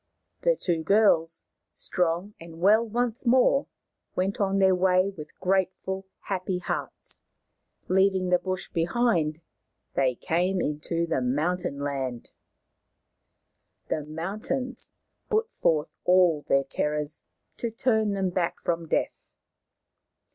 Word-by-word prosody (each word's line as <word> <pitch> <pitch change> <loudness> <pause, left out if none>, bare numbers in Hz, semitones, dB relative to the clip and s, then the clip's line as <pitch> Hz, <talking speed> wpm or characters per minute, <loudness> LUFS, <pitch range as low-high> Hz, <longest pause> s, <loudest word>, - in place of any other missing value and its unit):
The - - +3
two 170 - -1
girls, 165 -3 +3 0.3
strong 180 +3 -1
and 165 0 -11
well 210 +5 +5
once 240 +2 -2
more, 260 +3 +4 0.5
went 190 +2 -1
on 195 -1 +1
their 190 -1 +5
way 185 +1 +3
with 150 -4 -11
grateful, 190 0 -1
happy 185 -1 -2
hearts. 180 - -5 0.7
Leaving 190 -1 +3
the 180 0 +4
bush 185 0 -3
behind, 170 -3 +1 0.5
they 130 -2 +2
came 180 +8 0
into 165 +2 -1
the 165 -5 0
mountain 150 +5 -1
land. 135 -4 -4 1.6
The 155 - -1
mountains 205 - -4 0.4
put 445 0 +1
forth 155 -2 +2
all 180 -4 +4
their 135 0 +3
terrors 150 +2 -2 0.3
to 235 - -2
turn 220 -2 +1
them 190 -2 0
back 175 -1 -1
from 170 -1 -1
death. - - -2
180 Hz, 115 wpm, -27 LUFS, 160-200 Hz, 1.6 s, well